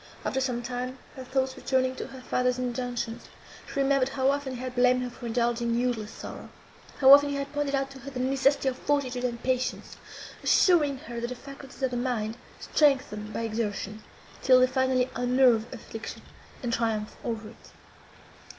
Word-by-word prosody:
After 265 - 0
some 245 -2 -1
time, 250 +1 -4 0.2
her 260 - -7
thoughts 260 0 -1
returning 260 -1 0
to - - -5
her 265 -1 -10
father's 250 0 0
injunctions, 245 -2 -3 0.4
she - - -4
remembered 270 -1 +3
how 270 0 +2
often 280 -2 -3
he - - -7
had 255 0 -5
blamed 250 0 +3
her 250 - -4
for 240 0 -8
indulging 235 0 0
useless 240 -3 -1
sorrow; - - -9 0.5
how 270 0 +9
often 285 0 +7
he 285 - -2
had 280 0 -4
pointed 290 -1 0
out 275 0 -1
to 270 - -11
her 270 +2 -8
the 260 -2 -6
necessity 270 +2 +2
of 260 -1 -1
fortitude 260 -4 0
and 235 -2 -2
patience, 255 0 -1 0.4
assuring 300 -7 +4
her, 235 -2 -7
that 240 - -2
the 250 - -5
faculties 275 0 -11
of 260 - +2
the 245 - -2
mind 235 -3 -1 0.2
strengthen 255 -8 +1
by - - -3
exertion, 215 -2 -3 0.4
till 255 -1 +6
they 255 - +6
finally 260 -1 +1
unnerve 245 -2 +3
affliction, 225 -1 -8 0.4
and 235 -1 -1
triumph 220 -2 -1
over 220 -2 -4
it. - - -17
255 Hz, 180 wpm, -28 LUFS, 240-265 Hz, 0.5 s, how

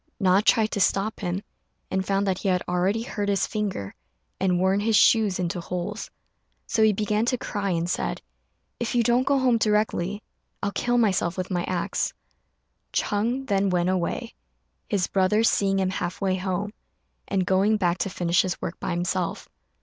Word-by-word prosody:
Na 190 -1 +4
tried 220 0 +3
to - - -2
stop 200 +2 +1
him, 185 +1 -3 0.5
and 190 - 0
found 195 +1 0
that 190 -2 0
he - - -3
had 180 -1 +1
already 185 +5 +1
hurt 205 -3 -3
his 200 -1 +2
finger 200 - -3 0.5
and 180 -2 +2
worn 190 +2 +2
his 220 +1 +1
shoes 210 -3 +4
into 175 -1 -2
holes; 180 +5 -4 0.6
so 220 - 0
he 220 0 +6
began 210 +1 0
to 250 +2 +1
cry, 205 -4 -3
and 170 -1 0
said, - - -2 0.6
"If 235 0 -2
you 240 - +4
don't 245 +2 +2
go 280 - +4
home 250 -3 +3
directly, 210 -2 0 0.4
I'll 200 - 0
kill 245 +4 0
myself 190 -6 +1
with 185 0 -3
my 175 -1 0
axe." 180 -2 -1 0.8
Ch'êng 235 +6 0
then 200 -3 +1
went 180 -1 +1
away, 185 -2 -2 0.6
his 195 -3 +1
brother 195 +4 +2
seeing 195 -3 +2
him 190 -1 +1
half 180 -2 -3
way 190 -1 +1
home, 190 +2 -3 0.5
and 190 -2 0
going 195 +4 +3
back 180 -2 0
to 195 - -1
finish 175 -2 +2
his 185 -2 -3
work 170 - -5
by - - -4
himself. 175 0 -2
195 Hz, 180 wpm, -25 LUFS, 180-215 Hz, 0.8 s, he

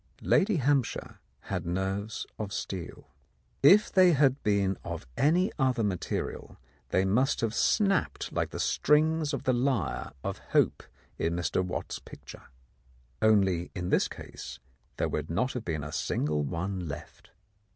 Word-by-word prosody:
Lady 205 +1 +3
Hampshire 140 -4 0 0.2
had - - -3
nerves 95 +4 -2
of 105 -2 -4
steel. 95 -4 -6 0.5
If 200 +10 +6
they 185 -2 +6
had 135 -1 +3
been 100 -2 +1
of - - -5
any 170 +7 +3
other 130 -3 +2
material 95 -4 -3 0.3
they 95 - +2
must 120 +8 +2
have 115 -1 0
snapped 195 - +1
like - - 0
the - - -6
strings 155 +1 +2
of 140 - -3
the 130 - +2
lyre 120 - -1
of - - -3
Hope - - +3 0.4
in 85 +1 0
Mr. 85 +1 0
Watts's 90 - -4
picture. - - -12 0.8
Only 95 -5 +3
in 90 -1 -3
this - - +3
case 65 - -9 0.4
there - - +1
would 75 0 -3
not 125 +10 0
have 125 - -4
been 80 -7 -3
a 75 - -6
single 75 -1 -1
one 90 +5 -3
left. 70 - -9
105 Hz, 145 wpm, -29 LUFS, 90-140 Hz, 0.8 s, If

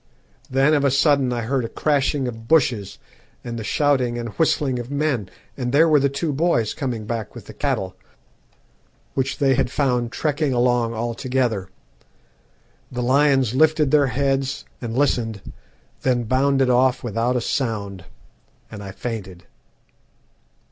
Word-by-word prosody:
"Then 135 +3 +3
of 145 -2 +2
a 140 - +4
sudden 140 -1 +3
I 120 -1 -2
heard 130 +2 0
a 115 - -4
crashing 140 -2 0
of 115 -1 -7
bushes 120 -10 +2 0.5
and 115 -1 -5
the - - -5
shouting 130 -2 +1
and 120 -1 -4
whistling 135 0 0
of 120 +1 -6
men, 140 -9 -1 0.3
and 125 -2 -3
there 155 +5 +5
were 155 -2 +5
the 140 0 +2
two 145 +3 -2
boys 135 -8 +1
coming 120 -6 -4
back 110 -2 -4
with - - -10
the - - -11
cattle, - - -2 1.2
which 135 0 -1
they 140 -3 +3
had 130 -1 +1
found 125 -4 0
trekking 150 -1 -1
along 120 -1 +1
all 115 +1 -2
together. 120 -6 -1 1.2
The 125 -1 -3
lions 135 -2 +3
lifted 155 0 +3
their 145 -2 +4
heads 135 0 -1 0.2
and 115 -1 -4
listened, 115 -7 -1 0.5
then 125 -2 +1
bounded 135 +2 +2
off 125 +1 +2
without 120 +2 -1
a - - +2
sound 105 -8 -3 0.7
and 105 -2 -8
I 100 - -7
fainted. 95 -6 -6
130 Hz, 150 wpm, -22 LUFS, 115-140 Hz, 1.2 s, there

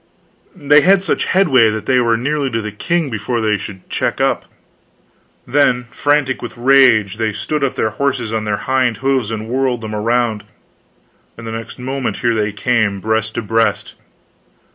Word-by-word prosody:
They 145 -3 +4
had 190 +3 +4
such - - 0
headway 135 - +4
that 110 0 -4
they 130 -1 +3
were 115 -2 +2
nearly 140 +3 -1
to 115 -2 -2
the 105 - -5
king 165 +7 -1
before 115 +2 -2
they 110 -1 +1
could 95 -2 -9
check - - -2
up; - - 0 1.0
then, 125 -1 +2
frantic 145 -2 0
with 120 - -8
rage, 120 -6 +4
they 110 -1 -1
stood 140 +8 -3
up 135 - 0
their 110 - 0
horses 125 -2 -2
on 110 -1 -1
their 105 -1 -1
hind 130 -4 +1
hoofs 130 -5 +1
and 110 -1 -5
whirled 125 -1 -1
them 110 -1 -6
around, 115 0 0 0.9
and 115 - -10
the 115 - -5
next 115 0 -7
moment 130 +1 -3
here 120 -2 +1
they 105 -2 -1
came, 105 -1 0
breast 110 +1 -1
to - - -2
breast. 115 +1 0
120 Hz, 175 wpm, -17 LUFS, 110-135 Hz, 1.0 s, They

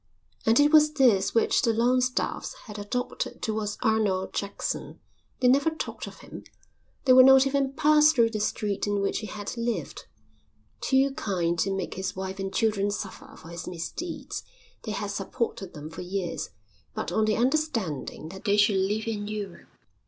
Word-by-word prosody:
And 225 +3 +5
it 290 +1 +5
was 305 -1 +6
this 235 -10 +3
which 230 - +3
the 230 - +2
Longstaffes 250 - 0
had 210 -2 -8
adopted 245 +5 -3
towards 215 -1 -2
Arnold 205 -4 +1
Jackson. 200 0 -4 0.4
They 250 - +4
never 275 +5 +4
talked 320 - -6
of - - -11
him. - - -10 0.6
They 255 - +7
would 255 0 +9
not 265 0 +7
even 275 0 0
pass 300 0 +5
through 235 -6 +3
the 215 - -3
street 205 -1 -1
in 205 0 0
which 200 - 0
he 215 - -6
had 205 +2 -6
lived. 235 0 -3 0.7
Too 270 +1 +2
kind 175 -9 -1
to 195 - +1
make 195 -2 -3
his 190 0 -4
wife 190 +1 -5
and 195 0 -3
children 205 0 +1
suffer 200 -1 -6
for 165 - -13
his 170 0 -7
misdeeds, 180 - -5 0.4
they 215 - -3
had 205 -1 -3
supported 195 -2 -4
them 150 +1 -8
for 165 - -7
years, 180 -1 -3 0.5
but - - -3
on 215 +4 +2
the 215 -1 +1
understanding 235 - -1
that 190 +2 -10
they 205 0 +3
should 205 -1 +4
live 205 +3 0
in 210 -2 -3
Europe. 205 -4 -6
215 Hz, 175 wpm, -27 LUFS, 195-255 Hz, 0.7 s, would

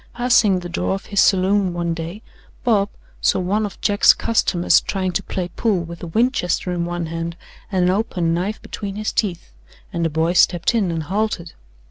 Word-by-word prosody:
Passing 235 -6 +3
the 175 - -6
door 175 +2 -1
of 195 - -8
his 200 -2 -1
saloon 190 -1 +3
one 170 -1 -1
day, 170 +6 -6 0.4
Bob 205 -5 +2 0.3
saw - - +3
one 205 +4 0
of 195 - -12
Jack's 205 0 +5
customers 180 -6 +2
trying 190 -2 -2
to 180 +2 -1
play 180 -2 -4
pool 195 -1 0
with 170 0 -9
a 175 - -5
Winchester 190 -2 0
in 170 -1 -1
one 175 0 -3
hand 165 +1 -4 0.3
and 185 -2 +1
an 180 - +3
open 185 -5 0
knife 190 +6 -2
between 200 -2 -6
his 215 +1 -3
teeth, 180 - -2 0.4
and 170 - -1
the 165 - +1
boy 160 +3 0
stepped 175 +3 +3
in 215 -6 +1
and 165 -1 -2
halted. 190 -1 -2
185 Hz, 190 wpm, -21 LUFS, 170-205 Hz, 0.4 s, Jack's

